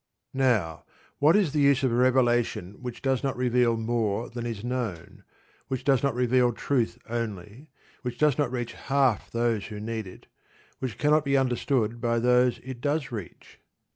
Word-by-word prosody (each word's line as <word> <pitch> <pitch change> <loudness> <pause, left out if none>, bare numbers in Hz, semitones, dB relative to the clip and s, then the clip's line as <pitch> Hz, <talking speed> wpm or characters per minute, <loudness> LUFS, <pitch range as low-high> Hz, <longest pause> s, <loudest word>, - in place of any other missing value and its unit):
Now, 115 -12 +1 0.4
what 150 +5 +5
is 195 -9 +2
the 150 - +1
use 140 -1 +4
of 130 - +2
a - - 0
revelation 120 -6 +2
which 125 0 -7
does 135 -2 +1
not 135 -2 -1
reveal 125 -2 +2
more 115 -1 -1
than 120 0 -4
is 115 -3 -5
known, 120 -9 -4 0.4
which 130 -2 -3
does 135 -3 +3
not 140 -4 0
reveal 125 0 +2
truth 120 0 -1
only, 115 - -5 0.3
which 125 -2 -5
does 150 -1 +3
not 140 -4 0
reach 120 -2 -3
half 135 -5 0
those 115 -3 -1
who 105 -1 -7
need 110 -1 -4
it, 90 - -13 0.5
which 125 -5 -4
cannot 150 +2 +3
be 140 -1 +2
understood 120 -3 0
by 115 -1 +1
those 125 +1 +3
it 130 -1 -8
does 145 -2 -1
reach? 105 -7 -9
125 Hz, 170 wpm, -27 LUFS, 115-135 Hz, 0.5 s, what